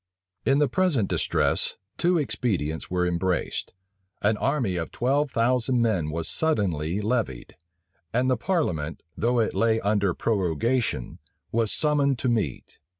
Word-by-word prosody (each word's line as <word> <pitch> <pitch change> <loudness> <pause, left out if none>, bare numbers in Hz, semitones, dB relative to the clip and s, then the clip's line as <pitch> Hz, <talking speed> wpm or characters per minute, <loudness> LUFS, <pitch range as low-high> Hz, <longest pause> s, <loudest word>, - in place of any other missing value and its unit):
In 135 0 +4
the 145 0 +3
present 140 - +1
distress, - - +1 0.2
two 175 0 +2
expedients 105 - -1
were 90 0 +1
embraced: 90 0 -1 0.5
an 105 +1 +3
army 130 -9 0
of 85 -2 -3
twelve 140 +4 +1
thousand 125 +1 +1
men 110 -10 +1
was 80 +1 -2
suddenly 95 - 0
levied; 105 - -2 0.6
and 125 +2 +1
the 130 - +3
parliament, 100 - -1
though 120 +2 +1
it 110 - +1
lay 115 -1 +2
under 100 -3 +1
prorogation, 100 - 0 0.3
was 115 -2 +1
summoned 145 -3 +2
to 125 - -1
meet. 105 - -2
115 Hz, 135 wpm, -26 LUFS, 90-130 Hz, 0.6 s, In